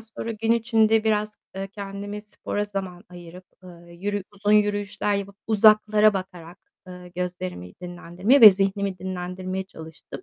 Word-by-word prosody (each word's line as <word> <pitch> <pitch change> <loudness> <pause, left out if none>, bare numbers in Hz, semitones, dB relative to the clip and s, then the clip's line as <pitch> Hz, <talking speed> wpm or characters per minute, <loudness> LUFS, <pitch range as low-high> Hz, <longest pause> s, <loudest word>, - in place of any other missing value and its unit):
sonra 225 +1 -7
gün 225 +1 0
içinde 225 -1 +2
biraz, 210 -1 0 0.2
eee, 195 0 -5
kendimi 205 +1 -7
spora 205 0 -4
zaman 195 -2 -6
ayırıp, 175 0 -12 0.2
ııı, 170 -1 -14
yürü 205 +3 -3
uzun 205 +1 0
yürüyüşler 205 0 +1
yapıp 200 0 -4
uzaklara 215 0 +5
bakarak, 180 -2 -7 0.3
ııı, 180 0 -10
gözlerimi 180 - -5
dinlendirme 180 +8 0
ve 215 -2 +12
zihnimi 195 0 -1
dinlendirmeye 185 0 -5
çalıştım. 160 - -11
200 Hz, 135 wpm, -24 LUFS, 180-210 Hz, 0.3 s, ve